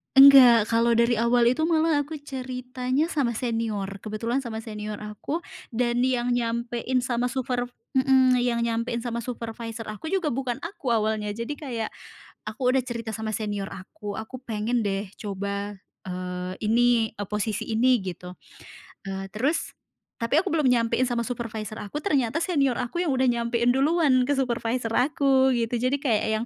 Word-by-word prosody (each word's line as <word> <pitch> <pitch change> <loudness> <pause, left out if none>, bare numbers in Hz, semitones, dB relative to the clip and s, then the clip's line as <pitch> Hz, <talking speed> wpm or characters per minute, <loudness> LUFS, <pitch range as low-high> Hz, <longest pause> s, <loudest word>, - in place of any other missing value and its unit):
enggak, 255 -5 +9
kalau 230 0 +3
dari 235 -1 +3
awal 235 +1 +3
itu 315 +5 0
malah 320 -2 +3
aku 315 +1 -7
ceritanya 255 +2 -2
sama 245 -6 0
senior. 220 -5 -2
Kebetulan 230 +5 -2
sama 225 -3 -5
senior 210 -1 -5
aku, 210 - -4 0.3
dan 240 +1 +1
yang 245 -1 +1
nyampein 240 +1 -1
sama 245 -1 0
superv 245 -1 -2 0.3
hmm, 260 -1 +5
yang 240 -1 +1
nyampein 235 +1 -1
sama 235 -1 -3
supervisor 230 -1 -6
aku 215 +9 -7
juga 360 -4 0
bukan 250 -1 -2
aku 295 - -2
awalnya. 215 -1 0
Jadi 230 +5 -4
kayak, 235 -7 -3 0.6
aku 215 +4 -7
udah 260 -1 +2
cerita 230 -2 -4
sama 220 0 -4
senior 205 -2 -3
aku, 200 +2 -8
"Aku 220 +4 -6
pengen 225 +1 -1
deh 195 0 -2
coba, 200 0 -4 0.3
eee, 180 0 -4
ini, 230 0 +3
eee, 205 -1 -4
posisi 210 0 -2
ini" 245 +3 +3
gitu. 180 -1 -6 0.8
Eee, 195 0 -4
terus 280 +9 0 0.5
tapi 275 +7 +3
aku 385 - -3
belum 305 -8 +2
nyampein 235 +1 +2
sama 240 -2 0
supervisor 220 -3 -5
aku, 250 +9 -5
ternyata 280 - +1
senior 280 -8 +1
aku 255 +8 -2
yang 325 - 0
udah 260 -1 +2
nyampein 235 0 +1
duluan 275 -2 +3
ke 280 - -1
supervisor 240 -3 -1
aku, 265 0 +3
gitu. 235 -1 0
Jadi 255 +4 0
kayak 230 -7 +1 0.2
yang, 235 - -3
240 Hz, 160 wpm, -25 LUFS, 220-260 Hz, 0.8 s, enggak